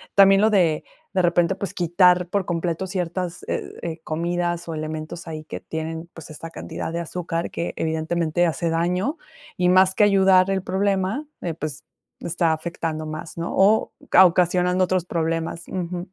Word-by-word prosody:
también 195 0 +7
lo 220 - +5
de, 170 -6 +3 0.3
de 185 - +2
repente, 175 +2 +3
pues, 200 - -5
quitar 180 0 +3
por 195 0 -1
completo 170 +1 -2
ciertas, 180 -1 -3
eh, - - -3
eh, 165 -1 -5
comidas 175 +1 -2
o 165 - -4
elementos 155 +2 -5
ahí 155 -1 -6
que - - -7
tienen, 160 +1 -5
pues, 165 - -11
esta 165 +2 -9
cantidad 165 - -6
de 170 - -1
azúcar 170 0 -3
que, 170 - -3
evidentemente, 160 +1 0
hace 170 +1 -1
daño 180 - 0 0.4
y 180 0 +3
más 185 +1 +5
que 210 - +4
ayudar 190 -1 +5
el 190 -1 0
problema, 195 +7 0 0.2
eh, 165 -3 -3
pues, 150 -2 -5 0.4
está 170 -1 +1
afectando 160 -1 -4
más, 155 +1 -7
¿no?, 170 - -3
o 205 +3 +4 0.2
ca 190 - +9
ocasionando 180 +1 +2
otros 185 -1 0
problemas. 165 0 -2
Ujú. 180 -1 -4
175 Hz, 165 wpm, -23 LUFS, 165-185 Hz, 0.4 s, ca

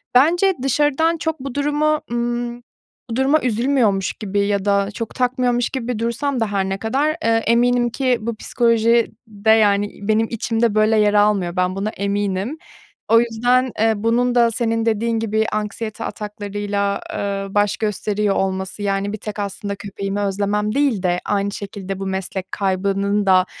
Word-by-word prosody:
Bence 350 +9 +5
dışarıdan 295 +4 +2
çok 320 -1 -3
bu 265 0 -6
durumu, 295 +1 +1
ımm, 240 0 -2 0.5
bu 225 - -3
duruma 275 +4 +3
üzülmüyormuş 230 -4 +1
gibi 205 -2 -3
ya 200 -1 0
da 200 0 +2
çok 225 +2 -6
takmıyormuş 250 -1 +1
gibi 245 -3 -3
dursam 245 +4 -1
da 225 - +1
her 195 -1 0
ne 195 - -2
kadar, 275 +9 0
eee, 230 - +3 0.2
eminim 240 +1 +3
ki 255 0 +1
bu 230 0 -3
psikoloji 230 0 +2 0.2
de 215 0 -3
yani 205 -2 +4
benim 215 +2 +1
içimde 230 -1 0
böyle 215 +1 +3
yer 210 -1 +3
almıyor, 205 -4 +2
ben 185 0 0
buna 200 +2 -2
eminim. 200 +5 -2 0.5
O 230 - +7
yüzden, 245 +2 +1
eee, 225 0 +4
bunun 240 +3 +1
da 235 -1 +4
senin 225 0 0
dediğin 225 +1 0
gibi 220 0 0
anksiyete 215 +1 -4
ataklarıyla, 205 -1 -3
eee, 200 -1 -2
baş 205 -1 +2
gösteriyor 210 -1 -1
olması 190 +1 -2
yani 200 0 -1
bir 215 - -3
tek 210 +1 -7
aslında 200 0 -4
köpeğimi 200 0 -5
özlemem 205 +2 -1
değil 275 -9 +1
de 180 -1 +1
aynı 200 -1 0
şekilde 195 -1 -6
bu 195 - -4
meslek 190 0 -4
kaybının 200 +1 0
da, 185 -1 +5
215 Hz, 160 wpm, -20 LUFS, 200-240 Hz, 0.5 s, O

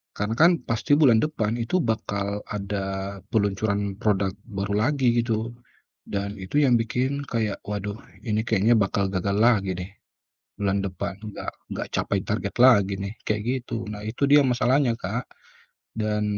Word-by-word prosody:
Karena 105 +1 -2
kan 165 +8 +6
pasti 115 +5 +1
bulan 130 -7 +5
depan 115 -6 -1
itu 120 +11 0
bakal 100 -3 -2
ada 100 -1 -4
peluncuran 100 -2 0
product 100 -2 +1
baru 100 -2 -3
lagi 130 -5 +2
gitu. 115 -1 -1 0.6
Dan 100 0 -3
itu 120 +11 +1
yang 125 -4 +4
bikin 130 +5 -1
kayak, 110 -3 -1
waduh, 105 +1 -4 0.2
ini 110 -3 0
kayaknya 110 +2 +4
bakal 100 -1 +1
gagal 100 +1 -1
lagi 105 -4 +3
deh 90 +2 -6 0.6
bulan 100 -1 0
depan 95 0 -4
nggak 105 0 -6 0.2
nggak - - -4
capai - - 0
target - - -3
lagi 100 -6 +6
nih, 100 +2 -4
kayak 105 -1 0 0.2
gitu. 115 -2 -4
Nah 105 0 -7
itu 120 +6 0
dia 145 0 +7
masalahnya 125 0 +2
Kak, - - -4 0.7
dan 105 -1 0
105 Hz, 150 wpm, -25 LUFS, 100-120 Hz, 0.7 s, dia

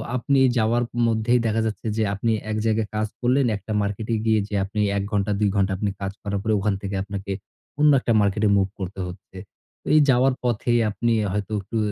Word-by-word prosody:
আপনি 135 +3 +1 0.2
যাওয়ার 115 +2 +2 0.2
মধ্যেই 115 +2 +2
দেখা 110 0 +1
যাচ্ছে 110 0 -4
যে 110 - +2
আপনি 110 +3 0 0.2
এক 110 - -1
জায়গায় 110 -1 +1
কাজ 110 0 0
করলেন 130 +2 +2
একটা 100 +2 -9
মার্কেটে 105 +3 -2
গিয়ে 110 -1 +3
যে 105 - -4
আপনি 100 +2 -5 0.2
১ 100 - -1
ঘণ্টা, 105 -1 0
২ 105 -1 +2
ঘণ্টা 95 -1 +1 0.3
কাজ 100 0 -2
করার 100 -1 -2
পরে 110 0 +1
ওখান 100 +1 0
থেকে 100 0 -4
আপনাকে 100 0 -6 0.5
অন্য 150 0 +6
একটা 120 - 0
মার্কেটে 105 +1 +1
মুভ 95 -1 +2
করতে 95 +1 -6
হচ্ছে। 95 +1 -11 0.6
এই 155 - +7
যাওয়ার 130 +1 +4
পথেই 120 0 +1
আপনি 115 +3 -1 0.2
হয়তো 105 +1 -3
একটু 115 +4 -5
110 Hz, 190 wpm, -23 LUFS, 100-115 Hz, 0.6 s, এই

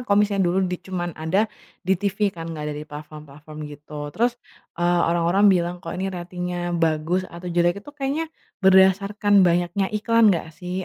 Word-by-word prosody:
kalau 200 - +4
misalnya 200 -2 +1
dulu 185 +2 +1
di 180 0 -2
cuman 175 -2 -4
ada 170 +7 +1 0.4
di 190 - +2
TV 200 0 0
kan, 165 -1 -8
enggak 155 -2 -5
ada 150 - -4
di - - -7
platform-platform 150 0 -11
gitu. 145 0 -8
Terus, 240 +1 +1 0.4
eee, 175 0 +2
orang-orang 175 +4 +2
bilang, 175 0 0
"Kok - - -6
ini 190 +1 -2
ratingnya 175 0 -4
bagus 165 +3 +1
atau 175 +1 -8
jelek 175 +3 +1
itu 290 - -12
kayaknya 290 +4 -2 0.4
berdasarkan 195 +2 +5
banyaknya 175 +3 +1
iklan 225 +1 +4
enggak 160 -2 -3
sih?" 180 +1 -4
180 Hz, 170 wpm, -23 LUFS, 165-200 Hz, 0.4 s, berdasarkan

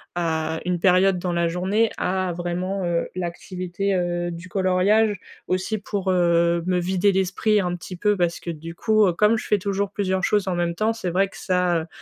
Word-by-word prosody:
à 160 -2 -1
une 180 -1 0
période 185 +1 +4
dans 175 0 -2
la 170 0 +1
journée, 190 +6 +1
à 185 -1 -1
vraiment, 180 +2 -3
heu, 170 -1 -1
l'activité, 185 +2 -3
heu, 175 -1 -1
du 170 +2 -8
coloriage. 195 +3 +2 0.3
Aussi 185 +4 -1
pour, 195 -1 -2
heu, 170 -1 +3
me 180 -1 +2
vider 185 +3 +2
l'esprit, 195 +3 +1
un 180 -2 -1
petit 180 +1 -8
peu, 210 +3 +2
parce 175 -3 0
que, 170 - -5
du 165 +1 -8
coup, 215 +2 +3
heu, 180 - +1
comme 210 +6 +3
je - - -6
fais 210 - +3
toujours 200 +1 -2
plusieurs 190 -2 -1
choses 205 0 +1
en 185 - 0
même 170 -1 -1
temps, 215 +4 +1
c'est 225 -5 -4
vrai 190 +3 +2
que - - -13
ça, 180 -3 0
185 Hz, 200 wpm, -23 LUFS, 175-195 Hz, 0.3 s, période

